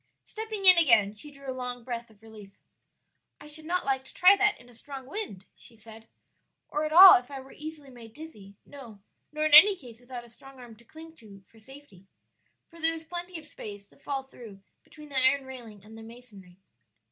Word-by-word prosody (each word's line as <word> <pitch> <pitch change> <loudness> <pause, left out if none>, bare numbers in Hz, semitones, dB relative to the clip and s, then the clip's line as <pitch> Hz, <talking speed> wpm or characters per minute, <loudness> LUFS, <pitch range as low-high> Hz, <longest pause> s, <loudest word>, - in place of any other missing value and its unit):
Stepping 435 -2 -6
in 365 -2 +9
again, 230 -10 +3
she 215 +8 -12
drew 275 -1 -16
a 260 - -4
long 250 -1 -7
breath 235 -1 -7
of 220 -1 -25
relief. 210 -3 -15 0.8
"I - - -15
should 305 +1 -5
not 360 +2 -3
like 265 -1 -2
to - - -18
try 370 +3 +5
that 410 +1 0
in 240 - -19
a 245 - -19
strong 265 +3 -11
wind," 265 - -8
she 235 - -17
said, 225 0 -16 0.6
"or 300 +1 -3
at 305 - -5
all 370 +3 +9
if 245 - -18
I 275 -1 -8
were 265 0 -15
easily 300 -2 -11
made 230 -3 -15
dizzy; 210 -11 -13
no, 245 -8 -14 0.3
nor 305 0 -3
in 310 - -1
any 385 +7 +9
case 245 -9 -15
without 245 -1 -10
a 240 - -17
strong 270 +3 -17
arm 240 -3 -13
to 235 - -21
cling 320 +6 -15
to 200 -3 -17
for 225 - -21
safety; 220 -6 -17 0.6
for 335 -1 -17
there 325 +1 0
is 325 - -10
plenty 350 +2 -8
of 315 - -13
space 205 -8 -11
to - - -24
fall 275 -1 -6
through 225 -7 -15 0.2
between 300 -1 -16
the 270 -2 -1
iron 270 +1 +2
railing 235 -6 -12
and 220 +1 -15
the 225 - -12
masonry." 225 -6 -16
260 Hz, 215 wpm, -26 LUFS, 225-310 Hz, 0.8 s, in